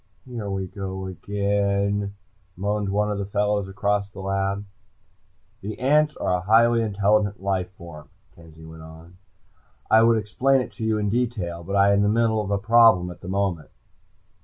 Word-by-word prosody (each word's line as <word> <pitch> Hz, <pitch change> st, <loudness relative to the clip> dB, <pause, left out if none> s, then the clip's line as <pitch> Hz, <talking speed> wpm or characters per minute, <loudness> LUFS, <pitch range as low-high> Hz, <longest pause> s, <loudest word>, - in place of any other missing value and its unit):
"Here 115 Hz, -5 st, -6 dB
we 95 Hz, -1 st, -3 dB
go 95 Hz, 0 st, -6 dB
again," 100 Hz, +1 st, -1 dB, 0.4 s
moaned 100 Hz, +1 st, -1 dB
one 105 Hz, +1 st, 0 dB
of 100 Hz, -, -3 dB
the 100 Hz, -, -2 dB
fellows 105 Hz, -1 st, 0 dB
across 100 Hz, +1 st, -1 dB
the 100 Hz, -, -12 dB
lab. 95 Hz, +1 st, -2 dB, 1.0 s
"The 105 Hz, +1 st, -6 dB
ants 150 Hz, +3 st, +2 dB
are 90 Hz, -, 0 dB
a -, -, -5 dB
highly 115 Hz, +4 st, +4 dB
intelligent 105 Hz, -1 st, +1 dB
life 95 Hz, -2 st, -2 dB
form," 85 Hz, -5 st, -12 dB, 0.2 s
Kenzie 80 Hz, -1 st, -16 dB
went 80 Hz, 0 st, -12 dB
on. 80 Hz, +2 st, -14 dB, 0.7 s
"I 110 Hz, -, +7 dB
would 115 Hz, 0 st, +4 dB
explain 125 Hz, +6 st, +1 dB
it -, -, -7 dB
to 115 Hz, -, -8 dB
you 110 Hz, -1 st, +1 dB
in 105 Hz, -1 st, -1 dB
detail, 105 Hz, -8 st, -2 dB
but 100 Hz, +4 st, -4 dB
I 100 Hz, 0 st, +5 dB
am 100 Hz, -, +3 dB
in -, -, +3 dB
the 105 Hz, -, +2 dB
middle 110 Hz, 0 st, +2 dB
of 100 Hz, -, -5 dB
a 100 Hz, -, +1 dB
problem 115 Hz, -4 st, +4 dB
at 90 Hz, +1 st, -13 dB
this 90 Hz, -, -8 dB
moment." 95 Hz, -5 st, -2 dB
100 Hz, 180 wpm, -23 LUFS, 95-105 Hz, 1.0 s, I